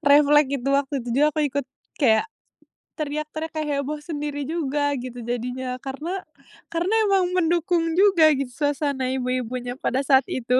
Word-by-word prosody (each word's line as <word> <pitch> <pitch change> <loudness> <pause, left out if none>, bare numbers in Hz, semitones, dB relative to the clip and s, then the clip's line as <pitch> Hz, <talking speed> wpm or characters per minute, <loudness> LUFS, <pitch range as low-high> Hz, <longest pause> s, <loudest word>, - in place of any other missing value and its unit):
reflek 295 0 +5
itu, 260 - -3
waktu 280 0 +1
itu - - -7
juga 295 +4 +4
aku 305 0 -2
ikut 280 -1 -2 0.3
kayak 225 -6 +4 0.7
teriak-teriak 305 +1 -4
kayak 310 -1 -4
heboh 300 +2 -4
sendiri 295 -2 -4
juga 290 -2 -1
gitu 245 -3 -6
jadinya. 250 +1 -3
Karena 310 +8 -4 0.5
karena 345 +5 -1 0.2
emang 385 -2 +3
mendukung 340 -1 +1
juga 380 -5 +6
gitu 275 -2 -2
suasana 285 -2 -1
ibu-ibunya 250 -1 -2
pada 265 +1 -1
saat 265 -1 +5
itu. 250 -1 -2
285 Hz, 145 wpm, -24 LUFS, 255-310 Hz, 0.7 s, juga